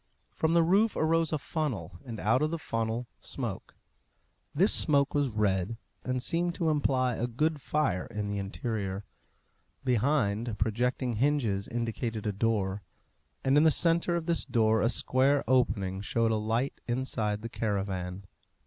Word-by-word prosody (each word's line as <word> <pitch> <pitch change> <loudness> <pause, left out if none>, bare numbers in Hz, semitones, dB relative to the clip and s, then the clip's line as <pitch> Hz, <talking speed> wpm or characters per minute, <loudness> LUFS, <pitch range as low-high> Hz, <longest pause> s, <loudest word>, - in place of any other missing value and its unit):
From 160 +1 +1
the 170 - +6
roof 200 +6 +3
arose 165 0 +2
a 155 - +1
funnel, 130 - -4
and 115 -5 -7
out 115 +6 +2
of 155 - +2
the 165 - -2
funnel 115 -4 -2
smoke. - - -6 0.8
This 185 +8 +4
smoke 140 -3 +3
was 145 -2 +2
red, 105 -1 0 0.3
and 125 -1 -2
seemed 170 +3 0
to 165 -3 +1
imply 130 -4 +1
a 120 - -1
good 150 +5 0
fire 110 -14 0
in 105 -2 -4
the 100 0 -2
interior. 100 -1 -3 0.8
Behind, 120 -4 +1
projecting 120 +3 0
hinges 120 -7 +1
indicated 115 -1 -3
a 105 - +1
door, 100 -2 0 0.6
and 135 +1 +3
in 150 - +6
the 160 - +7
centre 170 +2 +2
of 170 -2 -2
this 170 -1 +1
door 110 -2 +2
a 115 - +3
square 135 +3 +2
opening 100 -7 +1
showed 115 +3 +1
a - - +2
light 115 +5 -1
inside 115 -4 -1
the - - -3
caravan. 95 -4 -3
120 Hz, 155 wpm, -29 LUFS, 105-145 Hz, 0.8 s, the